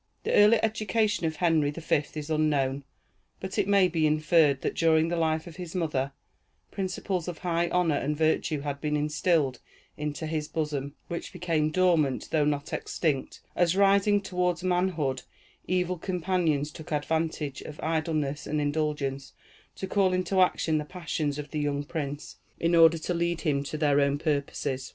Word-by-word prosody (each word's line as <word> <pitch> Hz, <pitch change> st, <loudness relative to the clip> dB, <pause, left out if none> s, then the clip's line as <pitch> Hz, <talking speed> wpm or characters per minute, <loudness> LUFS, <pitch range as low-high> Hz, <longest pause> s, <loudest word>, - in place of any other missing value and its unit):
The -, -, -1 dB
early 210 Hz, +2 st, +6 dB
education 215 Hz, -3 st, +1 dB
of 160 Hz, -, -3 dB
Henry 160 Hz, -3 st, +2 dB
the 150 Hz, -, -6 dB
Fifth 155 Hz, -1 st, -1 dB
is 150 Hz, +1 st, -5 dB
unknown; 140 Hz, -3 st, +1 dB, 0.5 s
but 190 Hz, 0 st, -4 dB
it -, -, +1 dB
may 200 Hz, -2 st, +5 dB
be 165 Hz, -3 st, +1 dB
inferred, 155 Hz, -2 st, +3 dB
that -, -, -1 dB
during 160 Hz, 0 st, +3 dB
the 175 Hz, -, -1 dB
life 160 Hz, -1 st, 0 dB
of 170 Hz, -2 st, -11 dB
his 180 Hz, -1 st, -7 dB
mother, 145 Hz, -6 st, -1 dB, 0.6 s
principles 185 Hz, -2 st, -3 dB
of 175 Hz, -3 st, -4 dB
high 170 Hz, -1 st, 0 dB
honor 175 Hz, -5 st, +2 dB
and 150 Hz, +2 st, -2 dB
virtue 155 Hz, -1 st, +1 dB
had 140 Hz, -1 st, -4 dB
been 150 Hz, -1 st, 0 dB
instilled 150 Hz, -2 st, +1 dB, 0.4 s
into 150 Hz, +1 st, -4 dB
his 155 Hz, -1 st, -2 dB
bosom, 150 Hz, -3 st, -3 dB
which 170 Hz, -, -5 dB
became 165 Hz, -4 st, 0 dB
dormant, 160 Hz, -6 st, +2 dB
though 155 Hz, -2 st, +2 dB
not 145 Hz, -1 st, -2 dB
extinct, 145 Hz, -6 st, -2 dB
as 175 Hz, 0 st, +2 dB
rising 200 Hz, +1 st, +4 dB
toward 180 Hz, -2 st, -1 dB
manhood, 175 Hz, -8 st, 0 dB, 0.5 s
evil 180 Hz, -1 st, 0 dB
companions 170 Hz, -5 st, 0 dB
took 160 Hz, -, -11 dB
advantage 155 Hz, -1 st, -1 dB
of 150 Hz, -, -9 dB
idleness 155 Hz, -3 st, -1 dB
and 150 Hz, -, -1 dB
indulgence 145 Hz, -2 st, -2 dB, 0.4 s
to -, -, -5 dB
call 190 Hz, -1 st, +2 dB
into 185 Hz, +1 st, +1 dB
action 160 Hz, -3 st, +2 dB
the -, -, -3 dB
passions 150 Hz, -3 st, -3 dB
of 150 Hz, -1 st, -7 dB
the 155 Hz, -, -2 dB
young 145 Hz, -1 st, -1 dB
prince, 145 Hz, -1 st, -5 dB, 0.2 s
in 170 Hz, +1 st, +1 dB
order 165 Hz, 0 st, +7 dB
to 170 Hz, +2 st, -3 dB
lead 170 Hz, 0 st, -1 dB
him 140 Hz, -4 st, 0 dB
to 150 Hz, +2 st, -5 dB
their 145 Hz, -2 st, +3 dB
own 140 Hz, 0 st, +2 dB
purposes. 140 Hz, -3 st, -2 dB
160 Hz, 170 wpm, -27 LUFS, 145-180 Hz, 0.6 s, order